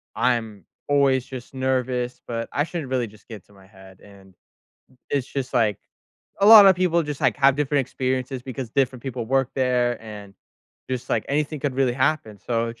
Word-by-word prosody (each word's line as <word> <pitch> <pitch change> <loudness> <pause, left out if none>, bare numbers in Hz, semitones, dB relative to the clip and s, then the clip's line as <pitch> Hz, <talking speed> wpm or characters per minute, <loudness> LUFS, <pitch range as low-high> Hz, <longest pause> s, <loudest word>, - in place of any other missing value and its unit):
I'm 110 -7 -1 0.2
always 135 -3 +3
just 130 -2 -10
nervous, 130 -1 -1
but 115 -1 -4
I 145 - 0
shouldn't 160 -4 -5
really 125 -2 -1
just 105 0 -19
get 110 -5 -10
to 100 - -23
my 95 -1 -19
head, 95 -1 -17
and 100 -2 -17 0.8
it's 140 -2 -1
just, 130 -1 -5
like, 110 -5 +2 0.6
a 200 - +4
lotta 205 -3 +10
people 175 -2 +1
just, 150 -2 -6
like, - - +2
have 135 -1 +4
different 145 -1 +1
experiences 130 0 -3
because 130 -2 -6
different 130 -1 0
people 125 -4 -5
work 135 0 +1
there, 125 -2 0
and 105 -2 -10 0.6
just, 130 0 -4
like, - - 0
anything 150 +1 -1
could 140 -2 -2
really 130 -2 +1
happen 130 -5 -1
so 115 -1 -2
it's 115 - -10
130 Hz, 185 wpm, -23 LUFS, 115-140 Hz, 0.8 s, lotta